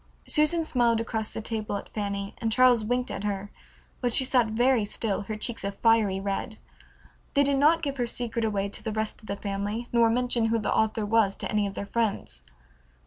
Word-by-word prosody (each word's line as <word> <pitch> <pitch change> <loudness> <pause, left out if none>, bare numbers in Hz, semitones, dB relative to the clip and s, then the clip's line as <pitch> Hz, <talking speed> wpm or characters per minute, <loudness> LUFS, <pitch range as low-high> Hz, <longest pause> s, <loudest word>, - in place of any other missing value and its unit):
Susan 315 +2 +2
smiled 240 -5 +2
across 220 -1 -3
the - - -5
table 215 -2 -3
at - - -8
Fanny, 200 -1 -3
and 225 -3 -1
Charles 245 -1 +5
winked 245 +3 -1
at 195 - -5
her, 205 -1 -3 0.5
but 245 -1 +1
she 265 - +4
sat 250 -3 +3
very 240 +2 +2
still, 205 0 -2
her 215 +2 -5
cheeks 230 0 -3
a 200 - -1
fiery 215 -2 +2
red. 200 +3 -3 0.8
They 285 - +5
did 280 -1 +2
not 325 +3 +4
give 280 -2 -2
her 245 -2 0
secret 235 -1 -2
away 200 -2 0
to - - -6
the 220 - -3
rest 215 0 -3
of 215 - -15
the 200 - -2
family, 205 +4 -4
nor 235 -1 +4
mention 245 0 +1
who 230 +1 +1
the 215 - -1
author 220 0 +1
was 205 -2 +2
to - - -5
any 210 -1 +1
of 195 - -7
their - - -4
friends. 205 - -2
225 Hz, 210 wpm, -27 LUFS, 205-245 Hz, 0.8 s, Charles